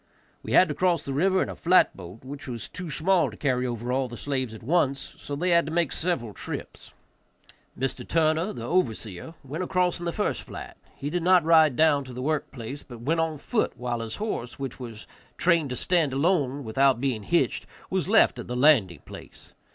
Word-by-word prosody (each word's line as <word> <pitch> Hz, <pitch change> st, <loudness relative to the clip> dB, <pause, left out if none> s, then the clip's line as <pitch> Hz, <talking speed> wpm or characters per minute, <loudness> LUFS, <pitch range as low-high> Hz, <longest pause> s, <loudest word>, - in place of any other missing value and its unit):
We -, -, -5 dB
had 185 Hz, -, +7 dB
to 150 Hz, -, -2 dB
cross 175 Hz, 0 st, +1 dB
the 135 Hz, -, -3 dB
river 185 Hz, +6 st, +2 dB
in -, -, -5 dB
a -, -, -6 dB
flat 180 Hz, +2 st, +4 dB
boat, 95 Hz, +4 st, -11 dB
which 140 Hz, +2 st, -8 dB
was 120 Hz, -3 st, -6 dB
too 180 Hz, -2 st, -7 dB
small 175 Hz, +5 st, +2 dB
to -, -, -12 dB
carry 125 Hz, -3 st, 0 dB
over 120 Hz, 0 st, -3 dB
all 130 Hz, 0 st, 0 dB
the 120 Hz, -1 st, -9 dB
slaves 130 Hz, -3 st, -2 dB
at 110 Hz, -, -12 dB
once, 140 Hz, -1 st, 0 dB
so 145 Hz, -, -5 dB
they 175 Hz, +5 st, 0 dB
had 170 Hz, -2 st, +4 dB
to -, -, -4 dB
make 170 Hz, -3 st, +1 dB
several 135 Hz, -, -2 dB
trips. -, -, -7 dB, 0.9 s
Mr. 135 Hz, +1 st, -3 dB
Turner, 165 Hz, +4 st, +2 dB
the -, -, -7 dB
overseer, 115 Hz, -, -2 dB
went 150 Hz, +7 st, -4 dB
across 180 Hz, -1 st, 0 dB
in 175 Hz, -, -6 dB
the 170 Hz, -, 0 dB
first -, -, -1 dB
flat; -, -, -9 dB, 0.2 s
he 145 Hz, +2 st, -5 dB
did 175 Hz, +1 st, -1 dB
not 180 Hz, 0 st, +5 dB
ride 160 Hz, -4 st, +5 dB
down 150 Hz, -2 st, +4 dB
to 130 Hz, -, -9 dB
the 125 Hz, -, -6 dB
work 155 Hz, +1 st, -1 dB
place, 130 Hz, +3 st, -7 dB
but 120 Hz, -4 st, -12 dB
went 160 Hz, +7 st, 0 dB
on 160 Hz, -1 st, 0 dB
foot, 215 Hz, +10 st, -1 dB
while 120 Hz, -1 st, -3 dB
his 115 Hz, -1 st, -5 dB
horse, 165 Hz, -, -4 dB
which 135 Hz, -2 st, -6 dB
was 115 Hz, -4 st, -8 dB, 0.3 s
trained 170 Hz, -5 st, +2 dB
to 125 Hz, -, -3 dB
stand 165 Hz, -2 st, +1 dB
alone 140 Hz, -2 st, +1 dB
without 130 Hz, +2 st, +2 dB
being 125 Hz, -4 st, -1 dB
hitched, 95 Hz, -, 0 dB, 0.2 s
was -, -, -1 dB
left -, -, +4 dB
at -, -, -7 dB
the 125 Hz, -, -4 dB
landing 125 Hz, -, +4 dB
place. -, -, -12 dB
140 Hz, 215 wpm, -26 LUFS, 125-170 Hz, 0.9 s, had